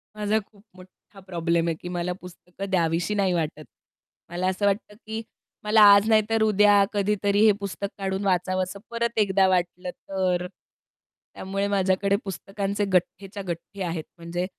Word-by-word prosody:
माझा 210 +1 +1
खूप 205 0 -18
मोठा 185 +2 -17
प्रॉब्लेम 170 -1 0
आहे 165 - 0
की - - -7
मला 180 0 -2
पुस्तकं 180 +2 -9
द्यावीशी 170 +1 +1
नाही 195 -3 +1
वाटत. 155 -2 -2 0.7
मला 175 +2 -2
असं 190 +2 0
वाटतं 205 +1 -1
की 220 +1 -4 0.4
मला 215 +1 +4
आज 200 +1 +4
नाहीतर 220 0 +3
उद्या 205 -1 +5
कधीतरी 205 0 +1
हे 215 - +7
पुस्तक 200 0 -4
काढून 195 0 -2
वाचावंस 185 0 0 0.2
परत 235 0 -2
एकदा 195 -2 +3
वाटलं 180 0 -1
तर. 180 -2 -2 0.9
त्यामुळे 195 +1 -3
माझ्याकडे 195 0 +1
पुस्तकांचे 200 +2 -3
गठेच्या 195 +2 -1
गठ्ठे 175 +4 -6
आहेत. 165 -2 -3
म्हणजे 170 +1 -3
195 Hz, 145 wpm, -25 LUFS, 180-205 Hz, 0.9 s, हे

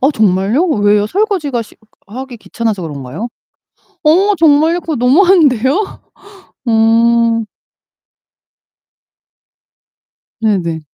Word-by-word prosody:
어 270 +3 +3
정말요? 215 - +1
왜요? 205 -7 +1
설거지가 355 - -1
시 - - -18 0.3
하기 255 +4 -8
귀찮아서 215 -3 -4
그런가요? 150 - -6 0.8
어 380 +7 +3
정말요? 320 +2 +3
그거 320 - -4
너무한데요? 290 - +2 0.7
음. 230 0 +2 3.0
네네. 180 -7 -1
235 Hz, 190 characters per minute, -14 LUFS, 210-310 Hz, 3.0 s, 어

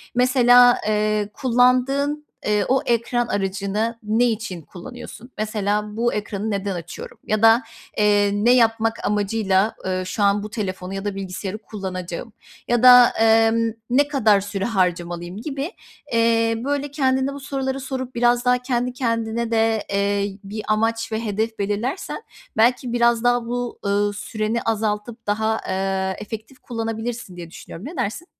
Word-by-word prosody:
mesela, 245 -1 +6
ııı, 210 -1 +1
kullandığın, 265 +4 +2 0.2
ııı, 210 -1 +2
o 265 +1 +2
ekran 240 +1 0
aracını 205 +3 -2
ne 220 +3 +2
için 220 -7 -2
kullanıyorsun? 240 - -11
Mesela, 210 0 -2
"Bu 240 +1 +1
ekranı 210 +1 -3
neden 200 -1 -2
açıyorum?" 170 -1 -8
ya 215 0 0
da, 225 +2 +6 0.3
eee, 205 -1 +3
"Ne 210 +4 +3
yapmak 225 -2 +2
amacıyla, 205 0 +1
ııı, 185 0 -1
şu 205 +3 -2
an 200 +1 +3
bu 215 - -6
telefonu 190 -4 -4
ya 195 +1 -5
da 205 -1 -2
bilgisayarı 195 +1 -5
kullanacağım?" 190 -1 -6 0.3
Ya 240 0 +1
da, 250 -1 +9
emm, 225 0 +3 0.2
"Ne 280 +4 +3
kadar 220 -9 +3
süre 200 0 -3
harcamalıyım?" 175 -3 -1
gibi, 285 - -4 0.4
eee, 230 0 +3
böyle, 285 0 -2
kendine 265 -1 +1
bu 280 - -7
soruları 270 -1 -3
sorup 260 -1 -5
biraz 240 +1 +2
daha 250 0 +4
kendi 250 -1 -1
kendine 230 -2 -1
de, 225 -1 +2
eee, 200 0 0
bir 210 +2 -6
amaç 225 +1 0
ve 220 +1 -2
hedef 220 +1 -2
belirlersen, 230 - -3 0.3
belki, 245 +1 +2
biraz 235 -1 +3
daha 245 -1 +2
bu, 245 0 -4
ııı, 205 +1 +1
süreni 215 +2 -2
azaltıp 220 +1 -2
daha, 220 +1 0
eee, 190 0 -1
efektif 220 +4 -8
kullanabilirsin 225 -3 -5
diye 170 -1 -8
düşünüyorum. 175 +5 -10
Ne 325 - -7
dersin? 235 +12 -3
225 Hz, 150 wpm, -22 LUFS, 205-245 Hz, 0.4 s, da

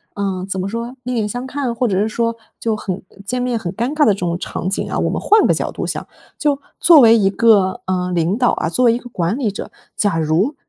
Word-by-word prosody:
呃 195 -2 -2
怎 190 - -3
么 190 - -3
说， 235 +3 -5
另 250 0 -2
眼 215 -2 0
相 245 +4 -5
看？ 260 -3 -3
或 250 - 0
者 195 -4 0
是 210 - +1
说 230 +1 -1 0.3
就 225 -1 0
很 190 -3 -4 0.2
见 250 +4 -2
面 245 -2 -1
很 175 -5 -4
尴 235 +5 -1
尬 305 -1 +3
的 210 - +5
这 195 - -7
种 175 -1 -1
场 180 - -4
景 195 - -2
啊， - - -2
我 - - +1
们 - - -2
换 430 +1 +4
个 - - +4
角 - - -2
度 - - -4
想。 - - -4 0.3
就 290 -2 +1 0.2
作 330 -4 +7
为 230 -1 +7
一 195 -3 +3
个 200 -3 +3
呃 180 -1 -1
领 175 +4 +1
导 250 -1 +3
啊， 160 - -1
作 250 +9 +1
为 230 - +5
一 - - 0
个 245 0 -11
管 180 +1 -1
理 240 -7 0
者， 200 - -7 0.3
假 205 -5 +1
如， 165 - +1
220 Hz, 280 characters per minute, -18 LUFS, 190-245 Hz, 0.3 s, 作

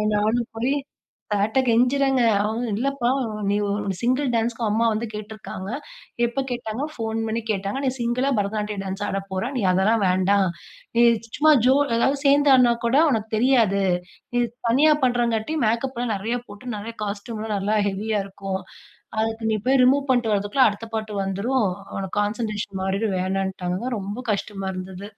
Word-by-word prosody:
நானும் 220 +3 +1
போயி 255 +5 +1 0.6
சார்ட்ட 210 +6 +1
கெஞ்சிறேங்க, 255 +3 +3 0.2
அவுங்க 220 +3 -1
"இல்லப்பா, 260 0 0 0.4
நீ 205 - +2
ஒரு 200 -1 -1
சிங்கிள் 255 +4 +1
டான்ஸ்க்கு 230 +1 -1
அம்மா 225 +3 +2
வந்து 220 +2 -1
கேட்டு 210 +1 -7
இருக்காங்க," 195 -2 -7 0.6
"எப்ப 265 +3 -1
கேட்டாங்க?" 240 +2 -3
"ஃபோன் 225 -1 -3
பண்ணி 225 +1 -1
கேட்டாங்க." 200 +6 -2
"நீ - - +3
சிங்கிளா 240 +3 0
பரதநாட்டிய 210 0 -2
டான்ஸ் 195 +1 -4
ஆடப் 195 0 -4
போற, 190 +7 -2
நீ - - 0
அதெல்லாம் 200 +4 +2
வேண்டாம். 190 +1 +3 0.5
நீ 240 - +6 0.3
சும்மா 310 +1 +6 0.2
ஜோ 265 - +6 0.2
அதாவது 270 +4 +2
சேர்ந்து 285 0 +5
ஆடுனா 245 -2 +5
கூட 250 +4 +3
உனக்கு 220 -2 -1
தெரியாது. 225 -5 +3 0.5
நீ - - +3 0.3
தனியா 300 +6 +5
பண்றாங்காட்டி 240 +3 0
மேக்கப் 235 +4 0
எல்லாம் 240 -3 -1
நெறையா 230 +5 -2
போட்டு 220 +4 -7
நெறையா 225 +3 -7
காஸ்டியூம்லாம் 215 +1 -4
நல்லா 205 +3 0
ஹெவியா 210 +2 -1
இருக்கும். 195 -1 -5 0.6
அதுக்கு 225 0 -1
நீ - - +2
போயி 265 -1 +5
ரிமூவ் 275 +2 +3
பண்ணிட்டு 240 -4 +2
வரதுக்குள்ள 205 +6 +3
அடுத்த 215 +2 -5
பாட்டு 215 -1 -4
வந்துரும், 210 +5 0 0.3
உனக்கு 195 +1 -3
கான்சன்ட்ரேஷன் 210 -2 -3
மாறிடும்." 195 +1 0
வேணான்டாங்க, 190 +1 -2 0.2
ரொம்ப 200 +4 -5
கஷ்டமா 195 -1 -3
இருந்தது. 185 +2 -7
220 Hz, 155 wpm, -23 LUFS, 200-245 Hz, 0.6 s, நீ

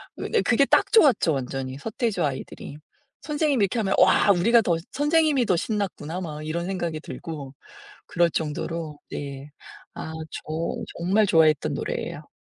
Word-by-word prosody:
근데 455 - 0
그게 260 +4 +4
딱 - - +3
좋았죠 275 - +5
완전히 130 0 -4
서태지와 210 - -1
아이들이. 135 +2 -8 0.4
선생님이 295 -6 +1
이렇게 225 +5 -2
하면 195 -3 +1
와 200 - +5
우리가 230 +6 +4
더 175 -6 +1 0.2
선생님이 295 -3 +2
더 185 - +3
신났구나.' 185 -4 -3
막 155 -3 -6
이런 170 +2 -2
생각이 170 -5 -3
들고 145 -6 -7 0.5
그럴 170 0 +2
정도로 155 0 -3
네 140 0 -6 0.5
아 160 - -6 0.2
저 - - -7 0.5
정말 195 +5 +2
좋아했던 160 -4 +3
노래예요. - - -4
175 Hz, 330 characters per minute, -25 LUFS, 155-225 Hz, 0.5 s, 좋았죠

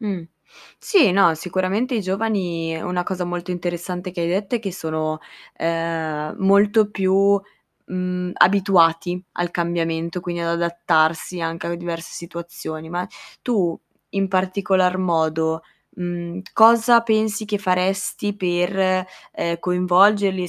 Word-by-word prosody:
Mh. 200 -6 -3 0.6
Sì, 330 - +4
no, 180 -4 +5
sicuramente 185 - -1
i 225 - +1
giovani, 185 -5 -2
una 180 +1 -2
cosa 180 0 -3
molto 175 +1 -4
interessante 180 +1 -4
che 175 -1 -6
hai 170 - 0
detto 195 +5 -1
è - - -3
che 200 -4 -5
sono, 155 -2 -3 0.4
uhm, 165 -2 -2
molto 205 +2 +4
più, 195 +1 +3 0.5
mhmm, 180 0 -3
abituati 180 -2 +3
al 175 -1 -2
cambiamento, 170 0 -2
quindi 175 -1 -4
ad 170 - -1
adattarsi 170 0 +1
anche 165 0 -3
a 170 - -2
diverse 170 -1 -6
situazioni. 170 -2 -7
Ma 175 +2 -3 0.3
tu 195 -9 0 0.3
in 195 -1 -1
particolar 185 0 +1
modo, 160 -2 0 0.3
mhmm, 175 0 -5
cosa 230 +1 +6
pensi 220 -1 0
che 210 -1 -2
faresti 190 +1 -1
per, 185 0 +1 0.3
uhm, 170 0 -1
coinvolgerli, 185 +2 +3
e - - -6
180 Hz, 130 wpm, -21 LUFS, 170-195 Hz, 0.6 s, cosa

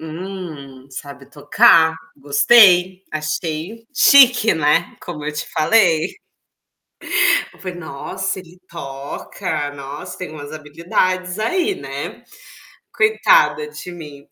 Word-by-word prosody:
"Hum, 160 -6 -9
sabe 140 +1 -10
tocar. 160 +2 +4 0.2
Gostei.", 180 +6 +4
achei 155 +7 -4
chique, 250 -4 +6
né, 160 +2 +1
como 155 -4 -8
eu 150 - -3
te 150 - -5
falei. 165 -1 +2 1.4
Eu - - -21
falei: 185 -2 -7
"Nossa, 185 +5 -5
ele 180 -1 -14
toca. 140 -1 -6
Nossa, 140 +1 -8
tem 185 - -7
umas 145 -1 -10
habilidades 180 +5 -2
aí.", 360 - 0
né. - - -7 0.7
Coitada 455 +2 +3
de 180 - -9
mim. 150 -4 -11
165 Hz, 105 wpm, -19 LUFS, 150-190 Hz, 1.4 s, chique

